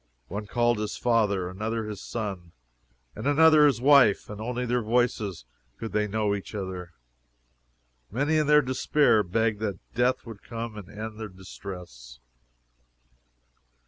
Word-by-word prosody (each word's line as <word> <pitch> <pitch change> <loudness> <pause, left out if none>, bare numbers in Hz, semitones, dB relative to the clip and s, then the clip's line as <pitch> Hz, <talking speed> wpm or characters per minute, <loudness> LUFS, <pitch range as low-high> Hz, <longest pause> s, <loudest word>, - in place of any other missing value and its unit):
One 105 +2 -5
called 120 0 +1
his 105 -1 -3
father, 105 -6 +1
another 110 +4 -3
his 105 -2 -6
son, 95 -7 -5 0.6
and 110 +6 -4
another 155 0 +6
his 130 -6 +1
wife, 130 -7 +5
and 105 +1 -7
only 125 +2 -2
by 125 - -4
their 125 0 +1
voices 110 - 0 0.3
could 115 - -6
they 105 0 +1
know 105 0 0
each 100 +1 -6
other. 95 -3 -5 1.2
Many 145 +8 +1
in 155 -2 +2
their 150 0 +6
despair 130 -2 +3
begged 110 +3 0
that 105 -4 -2 0.2
death 125 +1 +1
would 115 -3 -10
come 115 -1 -6
and 105 -4 -9
end 110 +1 -7
their 110 -1 -5
distress. 90 -10 -10
110 Hz, 145 wpm, -27 LUFS, 100-120 Hz, 1.2 s, another